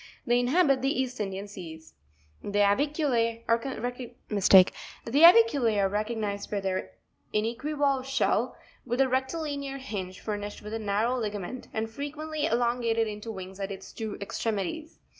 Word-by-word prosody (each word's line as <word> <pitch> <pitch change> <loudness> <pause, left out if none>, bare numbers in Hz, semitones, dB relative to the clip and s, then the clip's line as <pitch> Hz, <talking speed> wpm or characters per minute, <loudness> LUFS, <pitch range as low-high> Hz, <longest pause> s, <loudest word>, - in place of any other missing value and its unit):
They 240 +1 +3
inhabit 275 +1 +3
the 270 -1 0
East 255 -2 -2
Indian 195 -1 -3
seas. 165 -5 -10 0.2
' 75 0 -35
15. 200 - -6
The - - +1
AvicuLa# 230 -1 +1 2.3
are 195 -1 +3
recognised 210 -1 -2
by 205 - -1
their 185 - -3 0.4
inequivalve 270 +5 0
shell, 255 -2 +1 0.3
with 245 +1 -2
a 270 - +5
rectilinear 275 +1 -2
hinge 195 -9 -6
furnished 205 -1 -5
with 210 +1 -7
a 225 - -2
narrow 215 +4 0
ligament, 210 +2 -4
and 220 0 -2
frequently 300 +5 -3
elongated 235 -3 +1
into 210 +1 -6
wings 190 -1 -8
at 195 0 -3
its 195 -1 -9
two 220 -2 -5
extremities 220 - -3
(jig. - - -33
225 Hz, 140 wpm, -28 LUFS, 205-265 Hz, 2.3 s, a